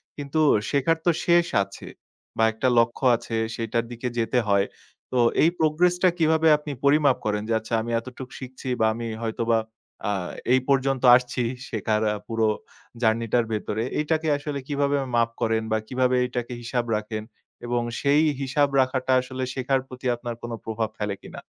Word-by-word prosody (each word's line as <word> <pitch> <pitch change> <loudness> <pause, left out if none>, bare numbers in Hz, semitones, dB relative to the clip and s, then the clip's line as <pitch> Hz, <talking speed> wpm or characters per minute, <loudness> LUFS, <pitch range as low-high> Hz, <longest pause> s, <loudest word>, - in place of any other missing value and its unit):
কিন্তু 145 +2 -3 0.3
শেখার 145 +3 +2
তো 175 - +5
শেষ 170 0 +4 0.2
আছে। 100 - -11 0.5
বা 110 - +3
একটা 120 +4 -1
লক্ষ্য 115 +3 0
আছে, 115 - -5 0.2
সেইটার 115 0 -1
দিকে 120 +1 -4
যেতে 115 +2 +1
হয়। 100 -1 +3 0.5
তো 130 - -1 0.3
এই 165 - +6
progress 165 +3 +3
টা 185 - +7
কিভাবে 160 0 +3
আপনি 150 0 -7
পরিমাপ 140 -2 +4
করেন? 105 -1 0
যে - - +2
আচ্ছা 110 +1 -8
আমি 120 - -4
এতটুক 130 +1 -9
শিখছি 130 0 -9
বা 110 - +4
আমি 115 +1 -5 0.2
হয়তোবা 115 0 +1 0.5
আ - - +1 0.4
এই 130 - +5
পর্যন্ত 135 -1 +2
আসছি 125 0 0 0.3
শেখার 110 -1 0
আ - - -3
পুরো 115 -1 +1 0.5
জার্নি 115 0 +2
টার 120 -2 +4
ভেতরে, 110 +1 -2 0.2
এইটাকে 160 +1 0
আসলে 145 -1 -4
কিভাবে 145 -1 +1 0.2
মাপ 115 0 +3
করেন 110 0 +1
বা 110 - +3
কিভাবে 130 0 +1
এটাকে 125 -1 -4
হিসাব 120 0 -2
রাখেন? 110 0 -4 0.4
এবং 120 0 0 0.2
সেই 145 +2 +4 0.2
হিসাব 140 +2 +2
রাখাটা 130 0 -1
আসলে 130 0 -5
শেখার 135 +1 0
প্রতি 130 0 -11
আপনার 120 0 -6
কোন 120 - -6
প্রভাব 110 0 -2
ফেলে 105 -1 -2
কিনা? - - -9
125 Hz, 170 wpm, -25 LUFS, 115-140 Hz, 0.5 s, টা